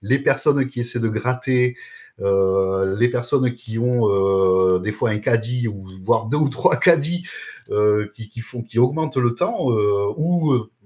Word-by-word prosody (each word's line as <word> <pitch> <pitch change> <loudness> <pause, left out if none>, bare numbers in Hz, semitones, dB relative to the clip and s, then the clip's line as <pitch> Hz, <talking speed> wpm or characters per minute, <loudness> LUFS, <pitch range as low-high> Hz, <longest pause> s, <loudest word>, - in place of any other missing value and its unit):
les - - 0
personnes 140 -1 +1
qui 130 -2 -8
essaient 120 0 -3
de 115 - 0
gratter, 125 +2 0 0.4
heu, 95 0 +1
les 120 +1 +3
personnes 125 +1 0
qui 115 -2 -9
ont, 120 -2 +1
heu, 95 -2 +3
des 105 +4 -3
fois 110 +1 -1
un 105 - -2
caddie 115 +2 -1
ou 100 -3 -7 0.2
voire 110 +4 +1
2 145 +7 -1
ou 150 -2 +2
3 130 - +2
caddies, 170 +1 +2 0.5
heu, 105 0 +1
qui 110 -2 -11
qui 115 +1 -9
font 120 0 -8
qui 115 +1 -3
augmentent 150 +5 +1
le 120 -2 +2
temps, 125 +1 -1
heu, 105 -2 +2 0.3
ou, 160 -2 +1
heu, 115 -3 -2
120 Hz, 180 wpm, -20 LUFS, 105-130 Hz, 0.5 s, les